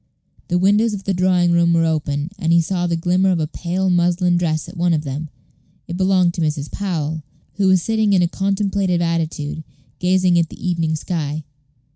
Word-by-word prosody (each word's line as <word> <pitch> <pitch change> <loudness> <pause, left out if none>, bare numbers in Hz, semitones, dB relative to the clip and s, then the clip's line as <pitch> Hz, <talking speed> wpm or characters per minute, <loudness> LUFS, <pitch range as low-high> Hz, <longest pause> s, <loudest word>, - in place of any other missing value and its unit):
The 175 - +1
windows 205 +4 +3
of 195 - -8
the 195 - -1
drawing 180 -1 +2
room 170 0 +3
were 165 0 +3
open, 155 -1 -1
and 165 -4 0
he 170 - +5
saw 175 +1 -1
the 170 - 0
glimmer 180 +3 +1
of 180 -2 +1
a 155 - 0
pale 175 +4 -3
muslin 175 0 +2
dress 160 -3 -1
at - - -11
one 175 0 +2
of 150 - -2
them. 145 +2 -5 0.6
It 170 - -5
belonged 185 -2 +2
to 170 - -4
Mrs. 150 -2 -2
Powell, 160 -6 -3 0.4
who 200 -1 +2
was 185 -2 +4
sitting 220 -2 +1
in 180 -2 +4
a - - +3
contemplative 195 -1 0
attitude, 160 -2 -2 0.4
gazing 180 -1 +3
at 165 -2 0
the - - -7
evening 165 -3 0
sky. 155 -2 -3
175 Hz, 195 wpm, -20 LUFS, 160-185 Hz, 0.6 s, he